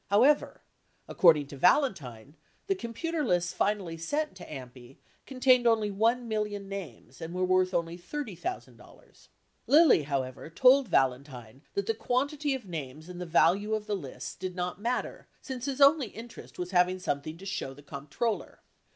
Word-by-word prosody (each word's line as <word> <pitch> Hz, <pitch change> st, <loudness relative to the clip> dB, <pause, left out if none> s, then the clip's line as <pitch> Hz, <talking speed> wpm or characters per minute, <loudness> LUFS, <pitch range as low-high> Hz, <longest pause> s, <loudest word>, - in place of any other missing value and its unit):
However, 250 Hz, +9 st, +3 dB, 0.4 s
according 155 Hz, -5 st, +5 dB
to 140 Hz, -, -9 dB
Valentine, 145 Hz, -, +1 dB, 0.3 s
the 395 Hz, -, +1 dB
computer 330 Hz, +2 st, -3 dB
lists 175 Hz, -7 st, 0 dB
finally 195 Hz, -5 st, -1 dB
sent 295 Hz, -, -2 dB
to 180 Hz, -, -10 dB
AMPI 125 Hz, -2 st, -10 dB, 0.3 s
contained 255 Hz, -2 st, +3 dB
only 220 Hz, -3 st, +2 dB
one 230 Hz, +4 st, +1 dB
million 210 Hz, -2 st, -3 dB
names 195 Hz, -3 st, -9 dB
and 165 Hz, +2 st, -6 dB
were 185 Hz, 0 st, +1 dB
worth 185 Hz, 0 st, +2 dB
only 170 Hz, -1 st, -2 dB
$30,000. 290 Hz, -, -8 dB, 0.4 s
Lilly, 305 Hz, -, +6 dB
however, 135 Hz, -1 st, -4 dB
told 255 Hz, +8 st, +5 dB
Valentine 130 Hz, -, -1 dB
that 200 Hz, -, -1 dB
the 225 Hz, -, 0 dB
quantity 280 Hz, +5 st, -1 dB
of 260 Hz, -, -8 dB
names 155 Hz, -2 st, -7 dB
and 180 Hz, 0 st, -8 dB
the 180 Hz, -, -5 dB
value 195 Hz, +6 st, +3 dB
of 215 Hz, -1 st, -4 dB
the 210 Hz, -1 st, -1 dB
lists 140 Hz, -9 st, -7 dB
did 185 Hz, 0 st, -6 dB
not 180 Hz, +1 st, -4 dB
matter 240 Hz, +3 st, -3 dB
since 260 Hz, -2 st, -6 dB
his 275 Hz, -1 st, -3 dB
only 280 Hz, -2 st, +6 dB
interest 230 Hz, +3 st, -11 dB
was 180 Hz, 0 st, -4 dB
having 180 Hz, 0 st, +3 dB
something 155 Hz, -2 st, -3 dB
to 190 Hz, -, -12 dB
show 190 Hz, -8 st, -4 dB
the 145 Hz, -, -15 dB
comp 140 Hz, 0 st, -9 dB
troller. 225 Hz, +8 st, -3 dB
190 Hz, 160 wpm, -29 LUFS, 160-245 Hz, 0.4 s, Lilly